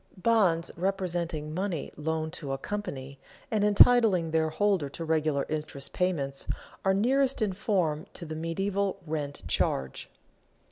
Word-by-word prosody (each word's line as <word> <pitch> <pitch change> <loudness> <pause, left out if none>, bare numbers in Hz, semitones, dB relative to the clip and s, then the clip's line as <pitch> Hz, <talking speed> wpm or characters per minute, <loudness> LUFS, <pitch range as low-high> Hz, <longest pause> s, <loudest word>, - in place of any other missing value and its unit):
Bonds 185 -6 +2
representing 170 -5 -2
money 180 -3 -2
loaned 160 +1 -2
to 145 -6 -4
a - - -1
company, 140 -7 -5 0.3
and 215 -2 +2
entitling 210 -5 +6
their 160 0 +2
holder 190 -4 +1
to 165 +4 -6
regular 155 -3 +1
interest 150 -3 -4
payments, 145 -7 -1 0.4
are 190 0 +3
nearest 265 +6 +3
in 210 -4 +1
form 180 -5 0
to 170 - -6
the 155 0 -5
medieval 195 +5 -1
rent 150 -3 -4
charge. 65 -1 -1
165 Hz, 135 wpm, -29 LUFS, 155-200 Hz, 0.4 s, entitling